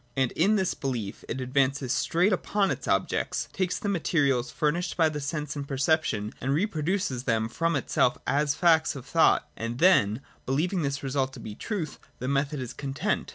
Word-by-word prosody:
And 130 -2 +2
in 195 +7 +3
this 190 -3 +1
belief 120 -8 -4
it 130 - -3
advances 130 0 +1
straight 175 +8 +2
upon 195 +1 +1
its - - -4
objects, - - 0
takes 185 -2 -1
the 215 - -4
materials 140 -9 +1
furnished 165 +6 -1
by 160 -2 +4
sense 150 0 -3
and 140 -1 -5
perception, 135 -6 0
and 135 +3 +1
reproduces 165 - -1
them 110 -3 +1
from 165 +8 0
itself 130 -2 +1
as 145 0 +1
facts 165 -2 +3
of 130 - -8
thought; - - +3
and 115 +1 -4
then, 130 - +4 0.3
believing 170 +8 0
this 140 -1 -2
result 135 0 -1
to - - -9
be 110 - -7
the - - -17
truth, 195 -9 -4 0.2
the 125 - -4
method 140 +1 0
is 125 -2 -5
content. 135 -1 -2
140 Hz, 180 wpm, -27 LUFS, 130-170 Hz, 0.3 s, by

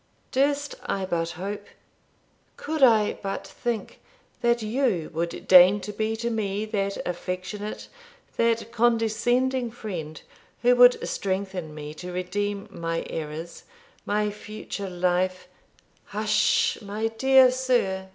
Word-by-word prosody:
Durst 285 +2 +1
I 195 -1 -1
but 170 -2 -1
hope 205 +2 -5 0.9
could 315 0 -4
I 225 -5 +5
but 195 -1 -4
think 235 -3 -4 0.4
that 235 -1 +2
you 215 - 0
would 170 +1 -3
deign 185 +2 +8
to 210 +2 -6
be 220 +1 -1
to 235 +1 -2
me 210 -1 -1
that 200 -2 -2
affectionate, 185 +4 -5 0.5
that 230 0 +1
condescending 240 +2 +1
friend, 175 -10 -6 0.4
who 245 +1 +5
would 245 0 +6
strengthen 190 -5 -3
me 150 0 -7
to 180 +3 -8
redeem 200 +3 -3
my 165 -2 -3
errors, 160 +2 -6 0.4
my 210 0 0
future 210 -1 -7
life 180 +1 0 0.3
' - - -35
'Hush, 215 0 +1
my 210 +2 -2
dear 265 +2 +5
sir! 240 -8 0
205 Hz, 120 wpm, -25 LUFS, 185-230 Hz, 0.9 s, deign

